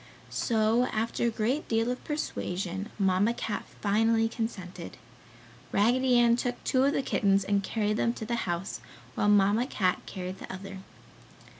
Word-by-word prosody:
So 225 +1 +2
after 225 +2 -1
a - - +3
great 230 +7 -1
deal 225 +1 +1
of 250 - -5
persuasion, 195 - -3
Mamma 195 +3 +2
Cat 215 - -3 0.2
finally 225 +2 +3
consented. 220 -6 -5 0.7
Raggedy 245 +4 +3
Ann 235 -1 +5
took 245 0 -2
two 260 0 +2
of 280 - +2
the 275 - 0
kittens 195 -5 +2
and 200 0 +1
carried 210 0 -1
them 230 - +2
to 220 - -6
the 235 -4 -2
house 170 -9 -3 0.3
while 205 - +1
Mamma 205 +4 +4
Cat 185 -8 0
carried 185 0 -6
the - - -8
other. 195 +1 -8
215 Hz, 155 wpm, -28 LUFS, 195-235 Hz, 0.7 s, Ann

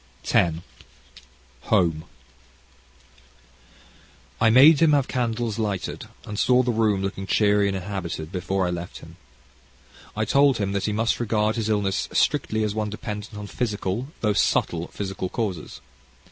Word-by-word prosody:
CHAPTER 85 -2 +2 0.6
X 60 +1 -18 0.4
Home 80 -3 +2 2.4
I 115 - +5
made 140 +6 +7
him 160 -2 +5
have 140 -3 +2
candles 115 -3 -2
lighted, 100 -4 -3 0.2
and 105 -1 -5
saw 125 0 +4
the 125 - 0
room 110 -4 +1
looking 95 0 -4
cheery 105 -1 +3
and 95 -1 -1
inhabited 90 -4 -5
before 95 0 -1
I 90 - -1
left 85 0 -6
him. - - -14 1.0
I 110 - +1
told 140 +2 +4
him 100 -2 -1
that 100 -1 -1
he 105 - 0
must 115 +2 0
regard 110 -2 0
his 110 -2 -2
illness 100 -3 0
strictly 110 0 +1
as 105 -1 -1
one 110 -1 -2
dependent 105 0 -6
on 105 - -6
physical, 105 +1 -3
though 105 -2 +2
subtle 85 -3 +1
physical 95 -2 -5
causes. 95 -9 -4
105 Hz, 145 wpm, -24 LUFS, 95-115 Hz, 2.4 s, made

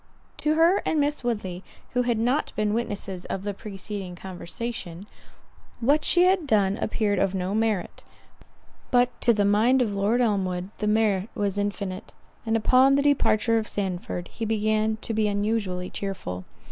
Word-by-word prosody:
To 305 +1 +1
her 335 +5 +4
and 315 - 0
Miss 290 -1 0
Woodley, 195 -6 -3 0.3
who 250 - +1
had 240 -2 0
not 250 +7 0
been 210 0 0
witnesses 200 -5 -3
of 195 - -4
the 205 0 -2
preceding 195 -2 -6
conversation, 185 0 -6 0.7
what 285 +6 +3
she 355 - +4
had 365 -4 +3
done 200 -4 +2
appeared 205 -3 0
of 195 0 +1
no 185 +1 -2
merit; 215 -4 -1 0.9
but 245 0 +3
to 240 - +5
the 205 -3 +2
mind 220 +6 +4
of 225 -5 +1
Lord 200 +5 +1
Elmwood, 190 -5 0
the 210 - -1
merit 210 -2 +2
was 205 -1 -1
infinite; 200 -2 -4 0.3
and 225 0 +2
upon 260 +5 +5
the 280 - +2
departure 230 -5 +3
of 215 - -4
Sandford, 180 -3 -3
he 230 - -7
began 215 0 +1
to 225 - -2
be 215 -1 +1
unusually 205 -3 -1
cheerful. 95 - -5
210 Hz, 160 wpm, -25 LUFS, 195-235 Hz, 0.9 s, to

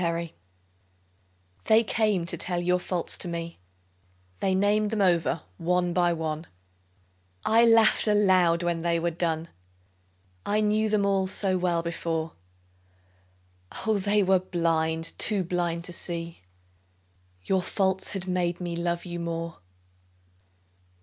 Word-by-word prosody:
Faults 170 -1 -2 1.3
They 220 +1 +5
came 210 -5 0
to 170 - -1
tell 175 -1 -2
your 180 +1 +1
faults 175 -1 -1
to - - 0
me, 170 -1 -5 0.8
They 190 -1 +1
named 205 +2 +2
them 220 0 -2
over 170 -3 +1 0.2
one 175 +1 0
by 175 -1 +2
one; 160 -1 -3 1.0
I 230 +1 +5
laughed 225 -1 +5
aloud 185 -5 +3
when 170 -1 -1
they 170 0 0
were 170 +1 -1
done, 165 -1 -2 1.0
I 210 +1 0
knew 215 +1 +1
them 210 -1 +1
all 195 -1 +1
so 190 0 0
well 175 -2 0
before, 165 -1 -3 1.5
Oh, 220 -2 +2
they 205 +1 +2
were 190 0 +3
blind, 165 -2 0
too 205 -3 +3
blind 170 -1 -2
to 180 - -7
see 170 - -6 1.0
Your 190 - +1
faults 190 0 0
had 190 -2 -5
made 180 -1 -1
me 175 -1 -4
love 170 +1 -2
you 175 -1 -5
more. 165 -1 -4
175 Hz, 130 wpm, -26 LUFS, 170-195 Hz, 1.5 s, They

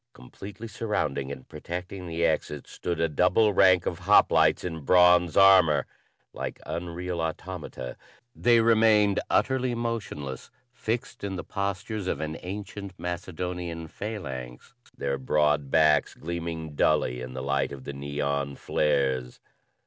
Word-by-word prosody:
Completely 100 - -10
surrounding 85 -11 -2
and 65 -2 -9
protecting 90 +1 -6
the 85 0 0
exit 75 -2 -1
stood 85 -2 -4
a 85 - +3
double 90 +7 +3
rank 95 -1 +5
of 85 - -2
hoplites 100 +4 +4
in 80 -3 -4
bronze 90 +2 +5
armor. 95 -6 +6 0.5
Like - - -5
unreal 85 0 -4
automata, 80 -5 -5 0.4
they 120 -1 +4
remained 110 -3 +4
utterly 130 -2 +1
motionless, 110 - -4 0.2
fixed 120 0 -4
in 100 -1 -3
the 90 - -5
various - - -27
postures 100 +1 -3
of 75 - -1
an 80 0 -3
ancient 100 0 -7
Macedonian 90 -1 -4
phalanx, 65 - -7 0.2
their 70 -1 -2
broad 75 +1 +1
backs 75 0 +3
gleaming 80 -1 -5
dully 60 -3 +1
in 65 0 -7
the 65 - -4
light 70 -1 0
of 70 -2 -8
the 70 - -6
neon 70 0 -2
flares. 65 -5 0
85 Hz, 135 wpm, -27 LUFS, 70-100 Hz, 0.5 s, armor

